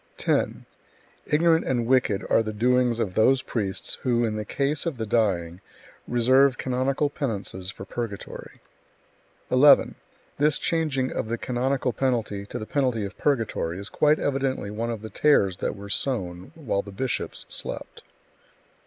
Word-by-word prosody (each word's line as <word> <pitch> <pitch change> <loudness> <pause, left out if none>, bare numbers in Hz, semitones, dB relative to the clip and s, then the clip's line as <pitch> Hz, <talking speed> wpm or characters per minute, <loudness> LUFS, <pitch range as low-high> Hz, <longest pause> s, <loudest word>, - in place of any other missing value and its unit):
10. - - 0 0.6
Ignorant 165 +2 +3
and 120 -3 0
wicked 115 -5 +2
are - - +4
the 110 -1 -3
doings 120 +2 +2
of 100 -5 -1
those 130 +6 +3
priests 100 -5 -2
who, 120 -2 +1
in 110 -1 -2
the 105 - -3
case 140 - -1
of 155 -6 -3
the 110 - -3
dying, 95 -6 0 0.5
reserve 130 +2 +4
canonical 130 +3 0
penances 100 -9 -3
for 95 - -8
purgatory. 110 -1 -7 0.9
11. 140 +3 +6 0.5
This 150 0 +3
changing 150 -6 0
of - - -3
the 115 - -1
canonical 130 +1 -1
penalty 110 -6 -1
to - - -5
the 110 - -5
penalty 125 -5 0
of 100 - -8
purgatory 115 - -1
is 100 +2 -7
quite 150 +5 +3
evidently 135 -6 -1
one 115 +3 -3
of 115 -2 -4
the 110 - -7
tares 100 -12 +3
that - - -2
were 100 0 -9
sown 100 -3 -2
while 130 -11 -1
the 100 - -11
bishops 125 +6 -3
slept. - - -5
120 Hz, 155 wpm, -25 LUFS, 105-135 Hz, 0.9 s, 11